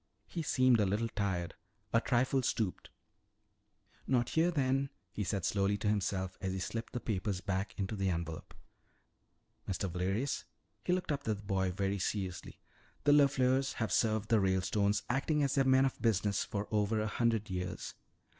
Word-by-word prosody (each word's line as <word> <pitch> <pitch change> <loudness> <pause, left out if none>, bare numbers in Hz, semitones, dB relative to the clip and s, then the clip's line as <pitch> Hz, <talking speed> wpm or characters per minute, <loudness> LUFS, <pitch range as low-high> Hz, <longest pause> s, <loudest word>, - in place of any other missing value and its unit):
He 170 - -4
seemed 130 -5 +4
a 105 - +4
little 105 +4 0
tired, 95 -5 -2 0.4
a 115 - +5
trifle 130 +2 +2
stooped. 110 -6 -2 1.2
"Not 125 -2 +2
here 165 +2 +3
then," 135 -3 +1 0.2
he 105 - -3
said 95 -2 -1
slowly 100 0 +1
to 105 - -3
himself 95 -2 -1
as 95 -1 -2
he - - -2
slipped 115 +5 -4
the 125 - -2
papers 100 -4 -2
back 95 +1 -2
into 100 +2 -2
the 95 -1 0
envelope. 85 -2 -4 1.1
"Mr. 95 +1 -1
Valerius," 95 +10 -1 0.4
he - - 0
looked 180 -3 0
up 145 - 0
at 140 - -21
the 110 - +1
boy 95 -2 -1
very 100 +2 -1
seriously, 95 -1 -3 0.5
"the 145 - +5
LeFleurs 135 -2 +4
have 110 -5 -2
served 110 -2 +1
the 115 - +5
Ralestones, 100 +2 +1
acting 145 +4 +1
as 140 -1 +1
their 135 -1 +3
men 130 0 +5
of 135 - -2
business, 105 -3 +2
for 105 0 -4
over 105 0 +1
a 110 - 0
hundred 110 -1 0
years. 90 0 -4
105 Hz, 170 wpm, -33 LUFS, 95-130 Hz, 1.2 s, a